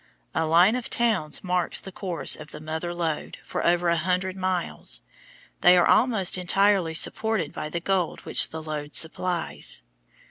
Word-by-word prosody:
A 160 +2 0
line 175 +7 +5
of 250 -2 -5
towns 210 -11 +1
marks 180 -2 0
the 195 - -9
course 175 -7 +2
of 155 0 -11
the 150 - -10
Mother 160 +3 -5
Lode 165 -3 -4
for - - -4
over 175 0 +2
a 170 0 +2
hundred 185 +3 -1
miles. 185 - -2 0.6
They 180 +1 +6
are 175 - +4
almost 215 -7 +3
entirely 185 -2 +2
supported 220 -3 +1
by 150 - -5
the 170 +2 -4
gold 185 -1 -1
which - - +2
the 160 0 -7
lode 150 -1 -6
supplies. 170 - 0
175 Hz, 165 wpm, -25 LUFS, 160-190 Hz, 0.6 s, They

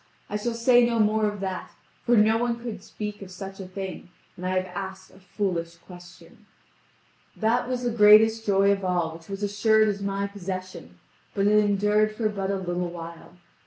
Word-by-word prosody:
I - - -2
shall 230 +3 -2
say 240 +1 +5
no 235 -1 +1
more 215 0 +3
of 205 -1 -4
that, 190 -1 -4 0.4
for 240 0 +5
no 215 +1 +5
one 235 0 -1
could 230 -5 -6
speak 210 +1 -7
of 195 - -9
such 195 +1 -9
a 190 - -7
thing; 190 -1 -7 0.3
and 180 - -10
I 185 - -1
have 185 - 0
asked 190 0 -7
a 190 - -18
foolish 175 -3 -3
question. 175 0 -15 0.9
That 235 +3 +1
was 250 -1 -2
the 240 - 0
greatest 220 +1 +6
joy 200 -1 +3
of 195 -1 -1
all 175 -3 0
which 165 +2 -13
was 195 +1 -5
assured 215 +2 +3
as 200 -1 -3
my 200 0 -2
possession, 185 -2 -7 0.4
but 200 -1 +1
it 210 +1 +5
endured 210 +1 +2
for 215 -1 0
but 195 -2 -3
a 200 - 0
little 180 -2 -3
while. 165 -1 -10
200 Hz, 195 wpm, -25 LUFS, 185-215 Hz, 0.9 s, greatest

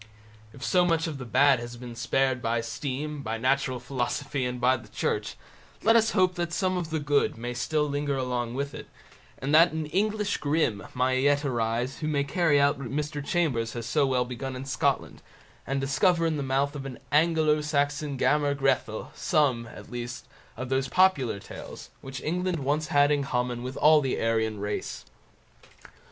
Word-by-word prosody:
If 135 +3 -11
so 180 -1 +4
much 165 -2 +1
of 155 -4 -4
the 125 - -6
bad 135 +2 +4
has 120 0 -7
been 120 0 -8
spared 130 +1 +1
by 115 0 0
steam, 140 +5 -4
by 115 -3 -3
natural 130 +1 +1
philosophy, 130 +1 -2
and 125 0 -3
by 130 +2 +3
the 120 - -13
Church, - - -2 0.5
let 225 +1 +5
us 225 0 +4
hope 185 -1 +4
that 175 -1 -3
some 185 +1 0
of 175 -3 -3
the 160 -1 -1
good 145 -4 +1
may 120 +2 -4
still 150 +5 0
linger 145 -1 -1
along 125 -2 -2
with 140 +1 -3
it, - - -8 0.5
and 140 +3 -3
that 165 +1 +6
an 160 -1 -2
English 210 +5 0
Grimm 145 -8 0
may 130 +1 +2
yet 145 +1 +2
arise 120 0 -1
who 155 - -3
may 145 -2 +1
carry 145 +1 +2
out 140 0 +3
what 135 - -5
Mr. 150 +1 -3
Chambers 140 -9 0
has 120 -2 -5
so 140 +4 +2
well 125 -2 +1
begun 130 +2 -5
in 130 +1 -6
Scotland, 135 - -1 0.5
and 135 +2 0
discover 165 +5 +2
in 160 -1 +1
the 145 - -2
mouth 140 +2 0
of 135 -1 -5
an 130 - -8
Anglo 155 0 +3
Saxon 145 -1 -1
Gammer 145 +1 +2
Grethel, 135 -5 -1
some, 135 -8 +1
at 110 - -12
least, 120 -1 -6 0.3
of 130 +1 -5
those 135 0 +1
popular 180 - +3
tales 100 - -10
which 135 -1 -7
England 180 +2 -1
once 145 +2 -1
had 145 0 +4
in 145 -1 +2
common 125 -2 -2
with 130 +1 -6
all 155 0 +6
the 135 -2 -1
Aryan 110 -2 0
race. 105 +1 -4
140 Hz, 190 wpm, -27 LUFS, 125-150 Hz, 0.5 s, that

